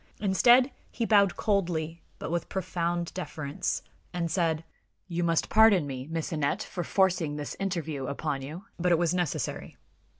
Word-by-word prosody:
Instead, 240 +7 +5 0.2
he 230 - -2
bowed 200 -4 +4
coldly, 170 -5 0 0.2
but - - -5
with 170 0 -2
profound 175 -2 -2
deference, 155 -5 -3 0.3
and 170 -2 -2
said: 165 -3 +1 0.4
"You 175 -1 -2
must 165 -1 +2
pardon 215 -7 +6
me, 130 -1 -5
Miss 165 0 -3
Aneth, 155 +6 0
for 175 - -4
forcing 175 -5 +1
this 145 -1 -5
interview 160 -8 -2
upon 140 0 -2
you; 155 +8 -7
but 180 +1 +2
it 170 - +5
was 170 0 +1
necessary." 175 -5 -2
170 Hz, 155 wpm, -28 LUFS, 155-190 Hz, 0.4 s, pardon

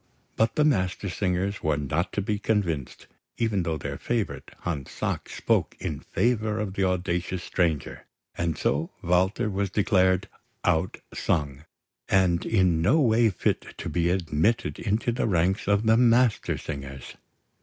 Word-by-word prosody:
But 115 0 +1
the 150 - +3
Mastersingers 95 -4 0
were 80 -1 +1
not 80 +5 -1
to 100 - -1
be 105 +1 -1
convinced, 85 - -1 0.3
even 110 -5 +1
though 80 -2 -1
their 70 - -5
favourite 115 -3 -2
Hans 75 -6 -3
Sachs - - -4
spoke - - +1
in 75 - -4
favour 110 -3 0
of 105 -3 -3
the 100 - 0
audacious 90 0 -1
stranger; 80 -5 -1 0.3
and 85 -2 -1
so 75 +4 0
Walter 95 +6 +2
was 100 -1 -1
declared 95 -2 +2 0.4
"outsung" 75 -3 -1 0.4
and 90 -3 +2
in 90 -6 +3
no 125 - +4
way 115 -4 +4
fit 95 - -2
to - - -4
be 85 0 +1
admitted 90 +4 0
into 110 +3 0
the 120 - -1
ranks 95 +1 +1
of 100 +2 +2
the 110 +1 +5
Mastersingers. 110 - +1
95 Hz, 140 wpm, -26 LUFS, 85-110 Hz, 0.4 s, the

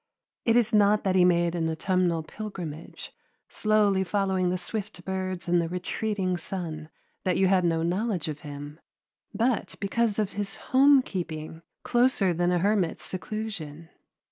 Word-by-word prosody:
It 230 - +4
is 240 -3 +3
not 210 0 +4
that 190 - +1
he 185 -1 +5
made 175 -1 +3
an 165 -2 0
autumnal 170 0 0
pilgrimage, 170 -4 -7 0.4
slowly 210 -3 +2
following 190 -2 0
the 180 - 0
swift 195 0 -6
birds 185 -1 -3
and 175 0 +3
the 165 - -3
retreating 185 +1 -2
sun, 160 -4 -6 0.3
that 185 - +1
you 190 - +4
had 185 -1 +3
no 165 -1 +1
knowledge 180 0 -1
of 155 -1 -4
him, 145 +1 -8 0.5
but 235 0 0
because 210 +1 0
of 210 -2 0
his 200 -1 -4
home 275 +1 +5
keeping, 160 -5 -5 0.2
closer 240 -7 +2
than 175 +1 +1
a 180 - +2
hermit's 195 -1 0
seclusion. 180 -6 -6
185 Hz, 150 wpm, -27 LUFS, 170-210 Hz, 0.5 s, he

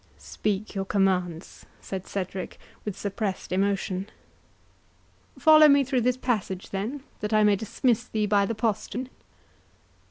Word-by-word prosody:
"Speak 210 0 -3
your 195 -2 -2
commands," 185 -4 -1
said 190 -1 -6
Cedric, 190 -1 -4 0.3
with 205 -2 -5
suppressed 200 -2 -3
emotion. 195 0 0 1.3
"Follow 310 -1 +8
me 280 -1 +5
through 260 -1 0
this 250 +1 +1
passage, 210 -7 -2
then, 225 +9 -3 0.2
that 210 +1 -3
I 215 0 +5
may 210 -1 +5
dismiss 230 +3 0
thee 215 -3 -1
by 200 -1 +3
the 230 - -2
postern." 230 +3 -2
210 Hz, 130 wpm, -26 LUFS, 195-240 Hz, 1.3 s, Follow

